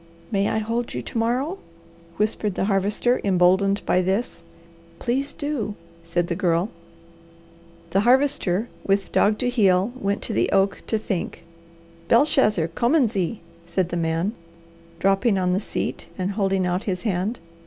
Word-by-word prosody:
"May 200 -1 +1
I - - 0
hold 230 +2 -2
you - - -3
to - - -5
morrow?" 255 +11 0 0.6
whispered 210 -1 0
the - - 0
Harvester, 205 +5 +1
emboldened 190 +1 +3
by 185 - +3
this. 190 +2 -1 0.6
"Please 265 +4 -1
do," 285 -9 -3 0.3
said 170 +1 0
the 170 - -2
Girl. 175 +1 +1 1.2
The 195 - +3
Harvester, 240 -4 +3 0.2
with 195 -1 0
dog 210 +1 +3
to 250 - -1
heel, 205 -3 +3
went 200 -4 -2
to - - -3
the 115 - +1
oak 195 0 +2
to 220 - +1
think. 195 -5 -4 0.6
"Belshazzar, 230 - +3
kommen 245 - +2
Sie!" 195 +1 -2 0.3
said 180 0 0
the 175 - -3
man, 165 +4 0 0.6
dropping 195 +4 +2
on 180 -1 +1
the 185 - +2
seat 215 - -4
and 185 +1 -1
holding 195 -2 0
out 180 +4 -1
his 185 -4 -2
hand. 210 +2 -1
200 Hz, 150 wpm, -23 LUFS, 185-230 Hz, 1.2 s, emboldened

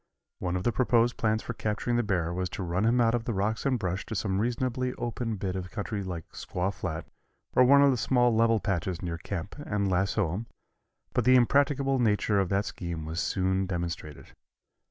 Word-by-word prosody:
One 90 -1 -2
of 90 - -2
the 120 - +2
proposed 120 -1 +2
plans 110 0 +1
for - - -4
capturing 110 +3 -1
the 120 - +3
bear 90 -6 -1
was 90 0 -2
to 95 - -3
run 90 +4 0
him 120 +2 +3
out 115 -1 +4
of 120 -2 -1
the 115 - -2
rocks 110 +7 0
and 130 -2 +2
brush 95 -3 -2
to 110 - -4
some 95 -1 0
reasonably 125 +2 -1
open 120 -1 -3
bit 95 -2 -3
of 95 -1 -4
country 105 0 -4
like 90 -4 -5
Squaw 95 +3 -3
Flat 90 -4 -4 0.5
or 125 - +6
one 140 +2 +7
of 140 - +6
the 130 - 0
small 120 0 +3
level 115 0 +4
patches 95 -2 -2
near 85 -1 -3
camp 90 +1 -5
and 105 -8 -1
lasso 95 -1 +1
him, 110 +5 -4 0.7
but - - +2
the 130 0 +6
impracticable 135 +1 +3
nature 105 -3 +2
of 95 -2 +1
that 100 +1 +1
scheme 85 -5 -5
was 80 +2 -3
soon 95 0 0
demonstrated. 85 -4 -5
105 Hz, 205 wpm, -28 LUFS, 90-120 Hz, 0.7 s, one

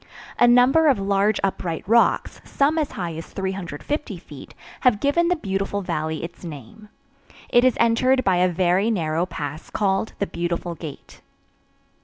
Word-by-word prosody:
A 240 - +6
number 250 +6 +5
of 275 -5 +4
large 200 +1 +1
upright 180 -4 -2
rocks, 235 +2 +2
some 295 +3 +1
as 300 - -2
high 175 -4 -4
as 165 - -7
350 190 - -4
feet, 150 -5 -13 0.2
have 245 -5 +3
given 290 +7 +2
the 360 - +2
beautiful 195 - -3
valley 155 -2 -3
its 170 +2 -8
name. 170 - -10 0.6
It 240 - +4
is 255 -1 +3
entered 255 +3 +3
by 185 -2 +2
a 180 +1 +3
very 180 +4 +1
narrow 165 -4 0
pass 155 -2 -6
called 195 +1 -1
the 200 - -1
"Beautiful 170 -1 -3
Gate." 155 -3 -10
195 Hz, 155 wpm, -23 LUFS, 170-240 Hz, 0.6 s, A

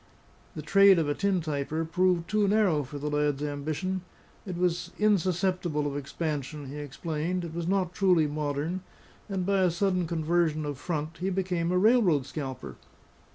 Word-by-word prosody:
The 155 - -5
trade 195 +3 +6
of 160 -3 +1
a 145 - +1
tin 195 +1 0
typer 155 +1 -2
proved 180 0 +1
too 210 +1 +2
narrow 195 -7 +3
for 145 +1 -7
the 145 +1 -4
lad's 150 -1 0
ambition; 155 +6 -2 0.5
it 180 -2 -4
was 175 -1 0
insusceptible 185 -6 +1
of 140 -1 -2
expansion, 145 0 -4
he 145 - -7
explained, 160 +5 -3
it 165 - -7
was 170 0 -3
not 185 -2 0
truly 180 -5 +3
modern; 150 +4 -2 0.5
and 190 -2 -2
by 200 0 +2
a 185 -1 +4
sudden 180 0 0
conversion 160 -1 0
of 145 -3 -4
front, 155 0 -4
he 185 +2 -1
became 180 -3 -1
a 180 - +2
railroad 190 - +4
scalper. 130 - -6
165 Hz, 165 wpm, -28 LUFS, 150-185 Hz, 0.5 s, trade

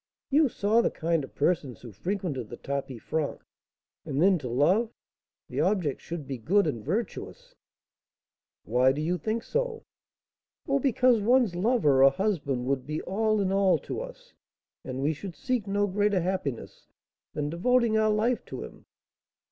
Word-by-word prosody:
"You 295 0 +4
saw 220 +2 +2
the - - +1
kind 165 -2 -1
of - - -11
persons 145 -5 0
who 120 - -10
frequented 150 - -3
the 120 - -8
tapis 135 -4 -5
franc. 155 -3 -2 0.6
And 135 - -3
then, 185 +1 +4
to 130 -4 -5
love, 175 - +2 0.6
the - - -4
object 185 -8 0
should 165 -3 -6
be 130 -2 -5
good 195 - +3
and 120 -9 -3
virtuous 240 - -4 0.6
" - - -67 0.3
"Why 130 +2 +3
do 145 - -4
you 175 +4 -1
think 220 +8 -2
so?" 480 -2 -2 0.8
"Oh, 275 0 +2
because 255 -3 +3
one's 240 -2 +3
lover, 175 - +3
or 135 - +9
husband, 140 -7 -1
would 130 0 -1
be 155 +1 -3
all 215 +2 +1
in 190 -1 0
all 195 -1 +3
to - - -5
us, - - -11 0.5
and 130 +1 -4
we 150 +3 +2
should 175 +3 -8
seek 250 -6 -2
no 205 +1 +1
greater 205 -1 +1
happiness 175 -9 -4 0.5
than 150 0 -2
devoting 235 +6 +2
our 215 0 +3
life 220 +3 +1
to - - -6
him. - - -7
But, - - -18
M. - - -25
185 Hz, 170 wpm, -27 LUFS, 140-220 Hz, 0.8 s, or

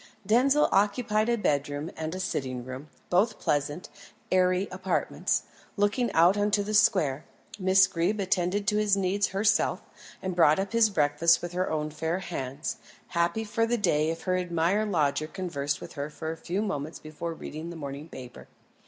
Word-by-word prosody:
Denzil 265 +8 +4
occupied 215 +2 +2
a 235 - +2
bedroom 145 -4 -1
and 160 +3 -4
sitting 130 -8 -3
room, 130 +4 -8 0.2
both 210 +5 +2
pleasant, 145 +3 -1 0.4
airy 185 +1 +3
apartments, 185 0 -1 0.3
looking 205 +4 +1
out 170 +4 +5
on 205 0 +1
to 205 -1 +2
the 210 +1 -4
square. 165 -9 +3 0.4
Miss 190 0 +5
Greeb 190 +3 -1
attended 190 +1 0
to 210 -2 +2
his 210 -2 +3
needs 195 +1 +1
herself, 200 +1 +1 0.4
and 185 -1 -4
brought 155 -3 +5
up 195 +2 -3
his 230 -1 +5
breakfast 160 -1 +3
with 175 - -4
her 185 +1 -1
own 155 -1 -2
fair 160 +3 -2
hands, 160 - -4 0.3
happy 170 +5 0
for 225 +1 0
the 240 +1 +1
day 155 -7 +2
if 165 0 -4
her 185 -1 +1
admired 180 +4 0
lodger 155 -4 +1
conversed 145 -6 -3
with - - -9
her 145 0 -4
for 160 +1 -5
a - - -5
few 175 +5 -3
moments 155 -6 -4
before 160 +2 -6
reading 155 +1 -7
the 170 - -7
morning 145 0 -7
paper. 125 -4 -10
180 Hz, 170 wpm, -27 LUFS, 155-205 Hz, 0.4 s, out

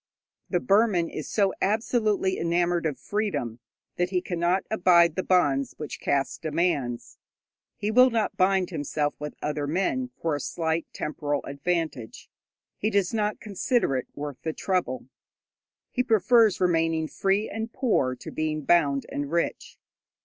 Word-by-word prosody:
The - - +1
Burman 200 -6 +2
is 155 - -6
so 200 -3 +2
absolutely 215 -2 +1
enamoured 170 0 +1
of 145 -4 -3
freedom, 145 - -2 0.4
that 180 0 +1
he 185 -1 +1
cannot 175 +1 0
abide 175 -5 +5
the 185 - 0
bonds 145 -8 +2
which 150 - -6
caste 135 -1 -1
demands. 145 -7 -1 0.6
He 210 +1 -1
will 250 +3 +7
not 225 -3 -1
bind 190 0 +2
himself 145 -1 -1
with 150 0 -6
other 150 -1 -2
men 195 - 0
for 165 -2 -1
a - - -3
slight 160 +2 -2
temporal 145 -1 -3
advantage; 145 -5 -3 0.5
he 215 - +1
does 200 -2 +1
not 210 -1 0
consider 210 - 0
it 130 - -2
worth 145 -2 -6
the 160 - -3
trouble. 180 -10 -1 0.9
He 250 - +1
prefers 225 -2 +4
remaining 165 -3 +1
free 195 +5 0
and 225 +2 -5
poor 210 - +1
to - - -9
being 155 -1 -2
bound 140 -4 +3
and 145 0 -4
rich. 170 0 -2
175 Hz, 145 wpm, -26 LUFS, 150-200 Hz, 0.9 s, will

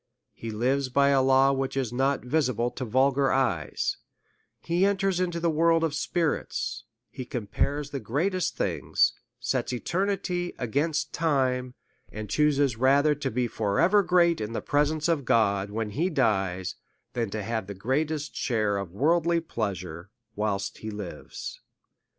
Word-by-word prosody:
He 115 - -7
lives 130 +5 0
by 140 +2 +3
a 135 -1 +4
law 135 +1 +5
which 135 0 -2
is 125 -4 -1
not 135 +1 0
visible 125 -4 +1
to 130 - -5
vulgar 135 +3 +2
eyes; 135 -1 0 0.6
he 170 +2 0
enters 195 -2 +2
into 175 -2 -1
the 170 - 0
world 165 +1 +3
of 160 -3 0
spi 165 +3 -1
rits; 160 -3 -1 0.3
he 130 - -6
compares 140 +5 -2
the 140 - -3
greatest 165 - -1
things, - - +1 0.3
sets - - -1
eternity 180 +5 -1
against 145 +5 -1
time; 130 -5 0 0.4
and 105 -1 -7
chuses 145 -5 +2
rather 140 +4 +4
to 145 -2 -3
be 125 0 0
for 105 -3 -1
ever 190 +5 +5
great 175 - +3
in 105 +1 -4
the - - -1
presence 150 +2 +1
of 165 -4 +1
God, 100 -5 +2
when 105 0 -3
he 165 - 0
dies, 95 - 0 0.4
than 115 -3 -1
to 105 +1 -4
have 110 -2 -3
the 100 - -6
greatest 145 +8 -1
share 110 -4 0
of 100 -3 -4
worldly 170 - +2
pleasures 95 - -4 0.3
whilst 100 -2 -2
he 110 - -6
lives. 105 -4 -7
135 Hz, 155 wpm, -27 LUFS, 110-160 Hz, 0.6 s, law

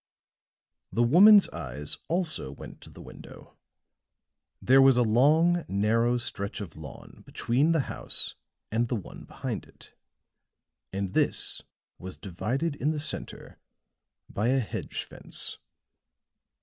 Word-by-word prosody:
The 120 - +1
woman's 195 - +7
eyes 75 0 -6
also 165 - -1
went 70 - -11
to - - -12
the - - -13
window; - - -13 1.0
there 135 +2 +5
was 135 -2 +6
a 125 - +4
long, 155 +10 +3
narrow 115 +5 +1
stretch 100 -3 -4
of 95 -7 -8
lawn 80 -1 -12
between 135 +7 0
the 165 -3 +2
house - - -2 0.4
and 115 +2 +1
the 120 - -2
one 105 - -8
behind - - -5
it; - - -17 1.0
and 95 -1 -4
this - - 0 0.4
was 95 0 -8
divided 125 - -3
in 145 - 0
the 150 - -3
center 145 - -5 0.7
by 105 +3 -2
a 135 +2 +3
hedge 115 - -5
fence. - - -4
120 Hz, 125 wpm, -27 LUFS, 105-150 Hz, 1.0 s, woman's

